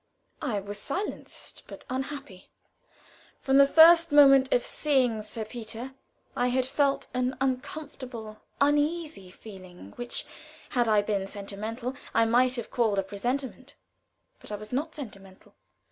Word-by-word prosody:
I 240 -9 -1
was 205 +1 -6
silenced, 375 - -5
but - - -11
unhappy. 265 -7 -6 0.9
From 270 0 +4
the 280 - +8
first 335 +2 +7
moment 275 -2 +7
of 245 - +2
seeing 255 -7 +1
Sir 215 +1 -6
Peter, 230 +3 -7 0.4
I 245 - +1
had 255 +1 +1
felt 275 +1 +1
an 255 +1 -1
uncomfortable, 255 -4 -4 0.2
uneasy 295 - +1
feeling, 185 - -12
which, 240 0 -5 0.4
had 240 -2 +1
I 210 -2 +4
been 200 -2 -1
sentimental, 215 +5 -5 0.2
I 230 - +5
might 250 +3 +3
have 235 - -6
called 225 -4 +1
a 195 - +2
presentiment, 245 +7 -4 0.6
but - - -11
I - - -2
was 215 +3 -9
not 305 +5 -2
sentimental. 195 -9 -11
245 Hz, 135 wpm, -28 LUFS, 215-275 Hz, 0.9 s, the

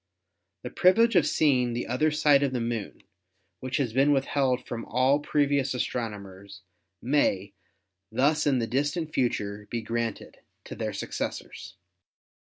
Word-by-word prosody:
The - - -6
privilege 225 +5 +4
of 165 -4 +4
seeing 130 -6 +2
the 120 - -3
other 130 +6 +1
side 150 -2 +3
of 140 -2 0
the 125 - -1
Moon, 115 -3 -4 0.6
which 130 +2 -3
has 125 -6 -1
been 135 +3 +3
withheld 135 -2 +1
from 115 -1 -5
all 130 +4 +2
previous 140 -3 0
astronomers, 100 -5 -5 0.4
may 105 -7 +1 0.6
thus 145 +6 +2
in 135 -2 +3
the 115 - 0
distant 145 +6 -2
future 105 -4 -2
be 115 -1 -3
granted 115 0 -4 0.3
to - - -9
their - - -3
successors." 95 0 -6
130 Hz, 140 wpm, -27 LUFS, 115-145 Hz, 0.6 s, privilege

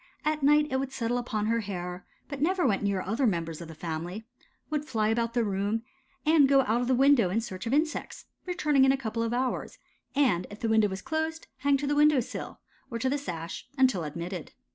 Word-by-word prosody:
At 305 0 +1
night 295 +2 +5
it 265 - +1
would 270 0 -3
settle 245 -1 -1
upon 220 -3 -2
her 230 +1 +1
hair, 180 -3 -5 0.2
but 285 -2 -6
never 360 +2 +2
went 205 -6 +2
near 200 -2 0
other 230 +7 +1
members 165 -4 -2
of 170 - -7
the 160 - -10
family; 170 +6 -5 0.5
would 300 -1 0
fly 220 -7 0
about 230 +1 0
the 240 - +3
room, 205 +2 -1 0.4
and 305 -3 +5
go 275 -1 +6
out 235 -1 +1
of 245 - -1
the 260 - +3
window 265 -6 +5
in 200 +5 +1
search 225 -2 -6
of - - -1
insects, 310 +1 -2 0.2
returning 300 -6 +2
in 265 - +6
a 270 - +1
couple 230 -3 -3
of 230 0 -1
hours, 250 +1 -2 0.4
and 235 -11 +2
if 205 - -10
the 225 - -1
window 220 -1 +4
was 190 -1 -6
closed 320 0 -2
hang 280 +1 +2
to 285 - -3
the 290 - +1
window 295 -1 +5
sill, 240 - -6 0.3
or 230 - -3
to 260 +3 0
the 285 - +1
sash, 165 - -6
until 255 -10 +3
admitted. 170 +3 -6
230 Hz, 225 wpm, -28 LUFS, 195-280 Hz, 0.5 s, go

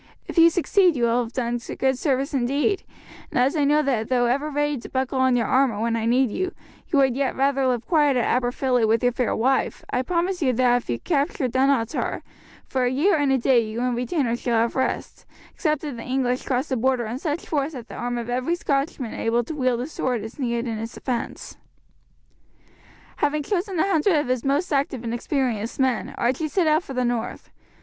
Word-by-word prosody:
"If - - -7
you 335 0 +8
succeed 355 +1 +3
you 245 - -1
will 235 +1 +2
have 225 - -10
done 240 -1 -1 0.2
good 265 0 +2
service 275 +2 -1
indeed; 280 - +1 0.5
and - - -4
as 260 +5 +2
I 300 - +2
know 300 +2 +3
that 240 -6 -1
though 245 -2 +2
ever 280 +5 0
ready 295 -1 -1
to - - -10
buckle 260 0 -1
on 260 -1 +3
your 235 -2 +1
armour 255 -4 +2
when 230 +1 0
I 225 0 -1
need 250 0 +3
you, 370 - -3 0.3
you 305 - 0
would 265 -3 +3
yet 275 -1 -1
rather 270 0 +2
live 245 -2 0
quiet 295 -5 +3
at 240 - +1
Aberfilly 250 0 +1
with 225 +2 +2
your 245 - +4
fair 245 -1 -1
wife, 260 +4 0
I 250 - +1
promise 355 +5 -1
you 260 -4 +2
that 245 0 +3
if 245 - -7
you 120 - 0
capture 280 - 0
Dunottar, 260 0 0 0.4
for 260 -1 -1
a - - +2
year 320 +10 +3
and 290 -3 +1
a 265 - +4
day 255 0 +4
you 215 +1 -6
and 250 - +1
your 245 - -1
retainers 245 -1 -1
shall 235 -2 +1
have 230 +1 +1
rest, 260 - -3 0.3
except 305 -4 -1
if 290 -4 -4
the 230 - -7
English 255 0 -1
cross 260 +3 -1
the 260 - 0
Border 250 0 +1
in 235 +4 -4
such 305 +1 -3
force 295 0 -1
that 245 -4 -8
the - - -11
arm 245 0 -3
of 235 -1 -4
every 255 +7 0
Scotchman 275 -6 -2
able 235 +1 0
to 280 - -6
wield 255 -4 0
a - - -2
sword 255 -6 -2
is 225 +6 -9
needed 235 -2 -1
in 225 -2 -3
its 225 +1 -6
defence." 245 -3 -4 1.6
Having 295 +1 0
chosen 380 +3 -2
a - - +3
hundred 370 -1 +2
of 295 -4 0
his 255 -2 0
most 290 +6 0
active 275 -3 0
and 230 0 -3
experienced 240 -3 -2
men 260 -4 0
Archie 260 +6 0
set 350 +3 +1
out 310 +1 +3
for 270 -7 -9
the 250 0 +1
north. 240 -1 -3
260 Hz, 220 wpm, -23 LUFS, 240-290 Hz, 1.6 s, you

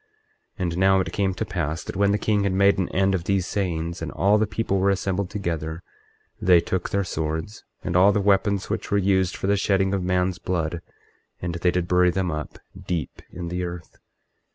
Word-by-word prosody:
24:17 - - -8
And 85 -1 -2
now 95 0 +5
it 95 - -2
came 95 -2 0
to - - -2
pass 85 -4 -3
that - - -7
when 100 +1 +3
the 105 - +2
king 105 0 +1
had 100 -1 0
made 100 +1 +4
an 95 - 0
end 95 +1 +2
of 90 -2 -2
these 95 -2 +1
sayings, 85 -4 -2
and - - -4
all 100 +2 +3
the 110 - +1
people 105 -2 -1
were 95 +1 +3
assembled 95 -1 -1
together, 85 -5 -4 0.6
they 90 -2 +6
took 90 +1 -2
their 100 0 0
swords, 80 +4 -4 0.2
and 90 - -3
all 95 +3 +6
the 105 - +1
weapons 100 0 +2
which - - -3
were 100 - +2
used 95 -2 +2
for - - -5
the 100 +1 +3
shedding 95 -1 +1
of 95 - 0
man's 90 0 0
blood, 85 -2 -2 0.6
and 90 -1 -3
they 85 +1 +1
did 90 0 -1
bury 90 0 +4
them 90 0 -1
up 75 0 -5 0.3
deep 85 -6 -3
in 85 -1 -6
the 90 +1 -2
earth. 85 -1 -7
95 Hz, 215 wpm, -24 LUFS, 85-100 Hz, 0.6 s, they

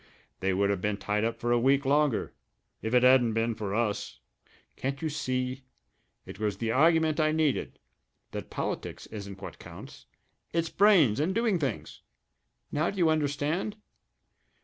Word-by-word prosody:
They 95 +1 0
would 100 +2 +2
have 100 -3 -2
been 105 0 -1
tied 105 +1 -1
up 115 0 -1
for 120 +1 -1
a 120 - +4
week 135 +3 +3
longer 145 -3 +1 0.5
if 110 - -3
it 125 - +5
hadn't 125 -3 +5
been 115 +1 0
for 105 -2 -4
us. 110 -3 -2 0.6
Can't 135 +1 -3
you 160 - -2
see? 130 -3 -2 0.6
It - - -10
was 105 -3 -1
the 115 +1 -1
argument 160 +3 +3
I 155 0 +3
needed 155 -3 0 0.5
that - - -6
politics - - -4
isn't 100 -2 -9
what - - -8
counts - - -12 0.5
it's 165 0 0
brains 175 - +5
and 175 +6 0
doing 225 -5 +2
things! 115 - -4 0.7
Now 155 +3 +1
do 200 - -7
you 170 -3 +4
understand? 155 +6 -1
130 Hz, 160 wpm, -28 LUFS, 110-155 Hz, 0.7 s, it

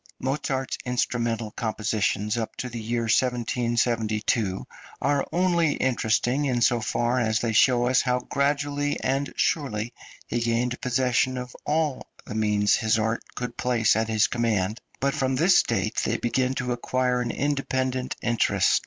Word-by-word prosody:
Mozart's 135 0 -2
instrumental 120 -3 -1
compositions 105 -1 -1
up 115 -2 -3
to 125 - -4
the 120 -1 -6
year 115 +2 -1
1772 115 -3 0 0.3
are 140 -1 +1
only 170 -4 +2
interesting 125 +2 +1
in 125 -3 +1
so 120 0 +3
far 120 +3 0
as 110 -2 +1
they 115 -2 -1
show 120 +2 +4
us 125 +1 +3
how 125 -1 +1
gradually 145 +2 -1
and 135 +2 -1
surely 120 -6 -1 0.3
he 120 - -2
gained 120 +2 0
possession 125 0 +1
of 125 0 -6
all 150 -2 0 0.2
the 120 - -7
means 105 -2 +2
his 110 0 +2
art 110 +1 0
could 125 0 -4
place 120 -4 +2
at 110 0 0
his 110 -1 +3
command; 110 -2 -1 0.2
but 140 +1 +1
from 130 0 0
this 175 +7 +5
date - - -2
they - - 0
begin 130 +2 0
to 125 -1 -2
acquire 125 +1 0
an 120 - -2
independent 130 -2 -1
interest. 120 -1 +2
125 Hz, 150 wpm, -25 LUFS, 115-130 Hz, 0.3 s, this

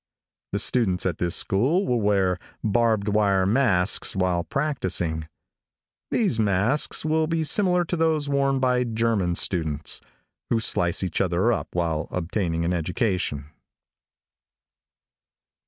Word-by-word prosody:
The - - -1
students 95 -8 +1
at 90 -4 -1
this 90 0 -1
school 140 - +1
will 120 -2 0
wear 95 -3 +1 0.2
barbed 110 -1 +1
wire 100 -2 +2
masks 100 -5 +2
while 90 -2 0
practicing. 90 - -2 0.8
These 200 - +1
masks 105 +10 +1
will 155 0 +1
be 165 0 0
similar 180 +2 +2
to 175 - -2
those 160 -3 +1
worn 140 -1 +1
by 125 -1 +2
German 110 -6 0
students, 80 -5 -1 0.5
who 115 - +2
slice 90 -5 +1
each 90 -3 -1
other 95 +5 +1
up - - -3
while 80 -3 -1
obtaining 85 -1 -2
an 90 - 0
education. 90 - -2
100 Hz, 120 wpm, -24 LUFS, 90-130 Hz, 0.8 s, wire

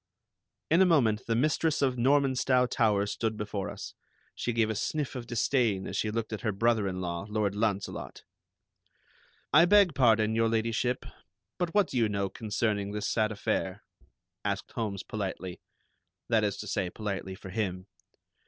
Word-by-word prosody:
In 170 +3 +5
a - - +7
moment 120 -10 +2
the 115 - +1
mistress 155 +4 +1
of 130 -2 +2
Normanstow 130 0 +3
Towers 105 -4 +1
stood 110 -1 -2
before 105 -2 -3
us. - - -8 0.4
She 120 - -2
gave 115 -1 +1
a - - -3
sniff 150 +6 -2
of 120 -2 -6
disdain 115 -4 +1
as - - -5
she 110 - 0
looked 110 0 -3
at 110 - -4
her 110 - 0
brother 110 0 +2
in 90 -1 -3
law, 85 +2 -4
Lord 105 -2 0
Launcelot. 105 -2 -2 1.3
"I 170 - +8
beg 200 -2 +5
pardon, 110 -5 +3
Your 115 0 +2
Ladyship, 115 +2 0 0.5
but 175 0 -2
what 205 -5 +4
do 130 - -3
you 115 -3 +3
know 100 -1 -1
concerning 105 -1 -1
this 105 0 -2
sad 110 -1 +1
affair?" 100 - -2 0.6
asked - - -2
Holmes 100 -4 -3
politely, 95 -4 -5 0.7
that 110 -2 +3
is 100 -1 0
to - - -7
say, 95 -3 -1
politely 95 -2 -4
for 95 0 -10
him. 95 -3 -2
110 Hz, 165 wpm, -29 LUFS, 100-125 Hz, 1.3 s, I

